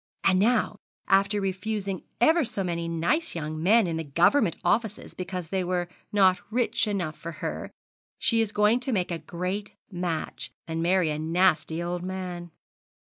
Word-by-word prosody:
And 185 -1 +4
now, 240 +5 +2 0.3
after 195 +2 +3
refusing 195 0 -2 0.2
ever 320 +6 +5
so 225 -5 -1
many 170 -2 -2
nice 170 - 0
young 155 -1 -4
men 215 +5 +5
in 165 -2 -2
the 165 - -2
Government 170 - +3
offices 220 -2 0
because 180 -2 -5
they 190 0 0
were 175 -1 -1 0.2
not 190 -3 +4
rich 235 -1 +1
enough 180 -7 -2
for 170 0 -7
her, - - -4 0.5
she 230 -1 +2
is 220 -2 -1
going 210 +3 +3
to 255 +1 -3
make 185 -6 0
a 170 - -2
great 185 +5 -4 0.2
match, 175 -3 -3 0.2
and 165 0 -2
marry 175 -1 +3
a 150 - -3
nasty 165 0 +2
old 175 0 -2
man.' 180 -1 -5
185 Hz, 165 wpm, -27 LUFS, 170-210 Hz, 0.5 s, ever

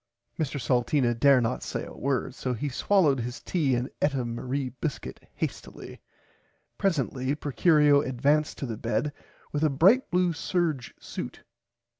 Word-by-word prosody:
Mr 145 -2 -1
Salteena 120 0 +1
dare 135 +3 +5
not 120 0 -1
say - - -4
a - - -10
word 135 -1 -1
so 125 -1 -3
he 145 +6 -3
swollowed 150 0 +2
his 120 +1 -4
tea 145 -8 0
and 120 +1 -1 0.2
eat 145 -1 +2
a 130 -2 -1
Marie 130 +3 -3
biscuit 150 -6 -4 0.2
hastilly. - - -6 0.8
Presently 135 -6 0
Procurio 150 0 +4
advanced 145 +4 +1
to - - -4
the 115 -4 -4
bed 125 +6 -1 0.4
with 150 +1 -1
a 155 - +4
bright 190 - +4
blue 180 -1 +2
serge 160 -6 -2
suit. - - -7
140 Hz, 150 wpm, -27 LUFS, 125-155 Hz, 0.8 s, dare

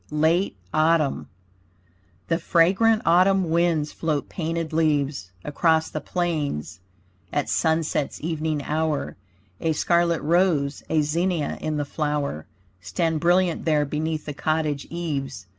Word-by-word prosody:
LATE 160 - +1 0.2
AUTUMN 155 - +2 1.0
The 165 0 +1
fragrant 195 +7 +3
autumn 185 +1 +4
winds 165 -3 +1
float 155 -3 -2
painted 165 -1 -3
leaves 145 - 0 0.2
Across 160 +2 +1
the 155 - -4
plains 145 - -2 0.5
at 145 - -1
sunset's 160 -3 0
evening 155 -2 -2
hour, 155 0 -1 0.4
A 160 - 0
scarlet 170 0 +1
rose, 160 -4 +2
a 155 -1 +2
zinnia 165 +1 -1
in 155 -1 -2
the 145 - -1
flower 145 - -2 0.3
Stand 155 - -1
brilliant 175 +1 +2
there 150 -2 +2
beneath 155 +2 -3
the 150 - -5
cottage 155 -1 -1
eaves. 140 - -4
160 Hz, 120 wpm, -24 LUFS, 145-170 Hz, 1.0 s, autumn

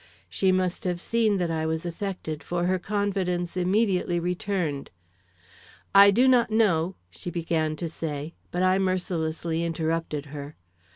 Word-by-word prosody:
She 185 - +1
must 185 -1 0
have 180 -1 -1
seen 220 +1 +1
that 175 -2 -1
I 160 -1 -1
was 160 +1 -2
affected, 170 -3 -4
for 175 0 -2
her 185 +1 +1
confidence 185 -3 -1
immediately 185 -1 +1
returned. 180 -5 -2 1.0
"I 200 0 +9
do 240 +6 +4
not 250 -3 +4
know, 190 -5 +2
" 90 - -42
she 85 - -7
began 165 -2 -1
to 170 +2 -4
say. 155 -1 -5 0.2
But 180 +1 -1
I 185 +1 +4
mercilessly 170 -3 -1
interrupted 165 -2 -2
her. 145 0 -7
175 Hz, 150 wpm, -26 LUFS, 160-190 Hz, 1.0 s, I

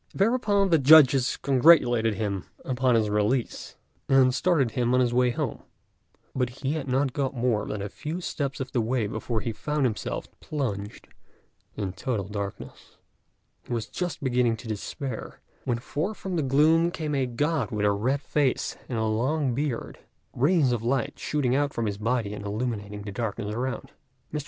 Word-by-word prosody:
Thereupon 205 -2 +2
the 165 - +5
judges 135 -3 +6
congratulated 125 -6 +4
him 100 -2 -2 0.2
upon 130 -1 +2
his 110 -2 +2
release, 105 +4 -1 0.3
and 130 -1 +5
started 140 -4 +2
him 120 +1 +1
on - - +4
his 120 -1 +2
way 125 0 +3
home; 120 - -3 0.7
but 125 -2 0
he 135 +2 -3
had 155 -3 -4
not 130 0 +1
got 135 -1 -1
more 115 -4 0
than 105 -2 -4
a - - -3
few 155 - -5
steps 140 -6 -3
of 130 -1 -4
the 120 - +1
way 115 0 0
before 110 +2 -3
he 115 - -2
found 150 +5 -1
himself 115 -4 -2
plunged 105 -9 -4 0.7
in 95 -3 -3
total 100 0 -3
darkness. 100 -1 -7 0.7
He - - -3
was 115 -2 -1
just 175 +3 -4
beginning 125 -3 +2
to 115 - -10
despair, 110 +4 -5 0.3
when 120 - 0
forth 150 - -3
from 190 -2 -4
the 165 - +1
gloom 155 +5 +4
came 155 -4 -4
a 135 -2 +1
God 145 0 0
with 105 -1 -1
a 105 - +4
red 125 +8 0
face 145 -4 0
and 120 - -2
a 110 - 0
long 130 +5 0
beard, 140 -2 -3 0.3
rays 145 0 +3
of 120 -3 0
light 135 +4 -1
shooting 130 -4 0
out 145 0 +1
from 115 - -1
his 100 -1 -3
body 110 -2 -1
and 105 - -7
illuminating 105 -1 -4
the 100 - -6
darkness 105 0 -3
around. 125 +3 -3 0.4
Mr. 150 - -1
125 Hz, 175 wpm, -26 LUFS, 110-145 Hz, 0.7 s, judges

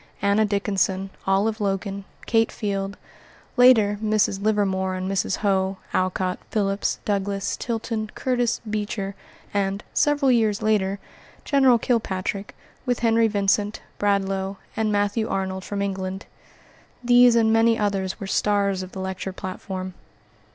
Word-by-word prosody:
Anna 200 +2 +3
Dickinson, 195 -2 0 0.2
Olive 210 +3 +1
Logan, 195 0 -2 0.2
Kate 225 -1 +2
Field, 200 -1 -3 0.6
later, 225 -5 +5
Mrs. 215 -2 +1
Livermore 195 -3 +1
and 185 0 -3
Mrs. 195 0 0
Howe, 190 -2 0 0.2
Alcott, 185 0 0
Phillips, 200 -2 0
Douglass, 200 -1 -1
Tilton, 225 -2 -3
Curtis, 245 -2 0
Beecher, 205 -2 -3 0.4
and, 200 0 -1
several 290 -2 +3
years 220 -3 +2
later, 200 -2 +1 0.5
General 265 -4 +5
Kilpatrick, 200 -4 -2 0.3
with 245 -2 -1
Henry 230 -1 +4
Vincent, 205 0 0 0.2
Bradlaugh, 195 -1 0 0.2
and 220 -1 0
Matthew 205 +2 0
Arnold 190 -1 -2
from 200 0 -3
England; 190 -1 -4 0.8
these 245 0 +6
and 225 -1 +4
many 225 0 +4
others 195 -3 -1
were 195 - -5
stars 200 -1 +1
of 185 0 -8
the 190 - -6
lecture 190 0 -4
platform. 185 0 -6
200 Hz, 125 wpm, -24 LUFS, 195-220 Hz, 0.8 s, these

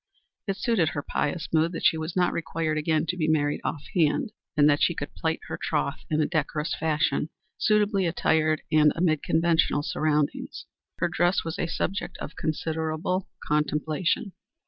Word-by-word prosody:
It 195 -1 -1
suited 195 -6 +2
her 145 - -4
pious 155 +4 -2
mood 165 +2 +3
that - - -4
she - - +5
was 160 +1 -4
not 180 -1 +2
required 165 -1 -2
again 155 +1 +1
to 180 - -2
be 160 -3 0
married 145 -2 +1
off 145 - -3
hand, 180 - +2 0.3
and 145 -1 +6
that 145 -1 +3
she 170 - +3
could 145 - -5
plight 160 0 -2
her - - -5
troth 150 -2 -1
in 155 - +1
a 155 - +3
decorous 150 -1 -1
fashion, 155 -1 0 0.3
suitably 210 -3 +2
attired 155 -2 +1
and 150 -1 +5
amid 160 -3 +2
conventional 160 -2 +2
surroundings. 150 -1 -1 0.3
Her - - +1
dress 175 +2 +1
was 165 -1 -5
a 170 - 0
subject 195 +3 -3
of 150 - -7
considerable 160 +3 -2 0.2
contemplation. 150 +6 0
160 Hz, 170 wpm, -26 LUFS, 150-170 Hz, 0.3 s, and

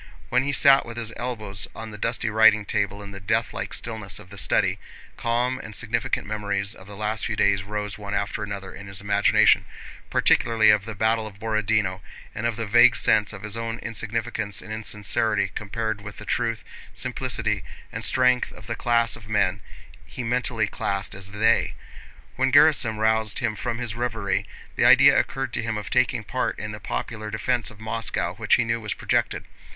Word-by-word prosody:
When 125 - +3
he 140 +2 -1
sat 140 0 +6
with 115 0 -9
his 115 -1 -4
elbows 110 -5 -4
on 110 0 -7
the 105 - -8
dusty 115 -1 -1
writing 110 -1 +5
table 100 +1 -1
in 100 - -9
the 100 - -8
deathlike 110 +4 -1
stillness 110 -5 -4
of 90 - -13
the 100 - -10
study, - - +1 0.4
calm 125 +2 0
and 110 -1 -9
significant 120 +3 -1
memories 100 -1 -2
of 95 - -13
the 100 - -10
last 105 +1 -1
few 110 - -2
days 100 -2 +3
rose 105 +1 -5
one 100 0 -4
after 100 +1 -2
another 100 -2 -6
in 100 - -10
his 95 -1 -4
imagination, 100 0 +4 0.5
particularly 110 -2 +4
of 105 -1 +2
the 110 -1 -6
battle 110 +1 +1
of 100 -2 -12
Borodinó 110 -3 0 0.3
and 115 - -2
of 115 - -2
that 115 0 -3
vague 120 +3 +6
sense 105 -2 +3
of 100 -2 -9
his 110 -1 -5
own 115 0 -3
insignificance 115 -2 -3
and 110 - -7
insincerity 105 -1 0
compared 110 0 -3
with 105 0 -9
the 105 - -9
truth, 115 -1 -1 0.3
simplicity, - - -1 0.3
and - - -5
strength 125 -1 +3
of 105 - -13
the 115 - -3
class 115 -1 +1
of 110 -2 -14
men 100 -1 +1 0.4
he 125 - -7
mentally 120 -2 0
classed 100 -1 -3
as 95 0 -6
they. 105 +3 +2 0.6
When 130 +1 +2
Gerásim 145 -6 +5
roused 110 -1 +1
him 120 -4 -1
from 115 +2 -3
his 120 -3 -3
reverie 115 -4 -2 0.3
the - - +1
idea - - +8
occurred 135 -2 -2
to - - -1
him 110 -1 -2
of 105 - -6
taking 125 -2 +2
part - - -2
in - - -5
the - - -7
popular 105 - -4
defense 120 +3 -1
of 110 - -15
Moscow 110 +1 -2
which - - +2
he - - +2
knew 115 0 -1
was 105 -1 -3
projected. - - 0
110 Hz, 190 wpm, -24 LUFS, 105-115 Hz, 0.6 s, idea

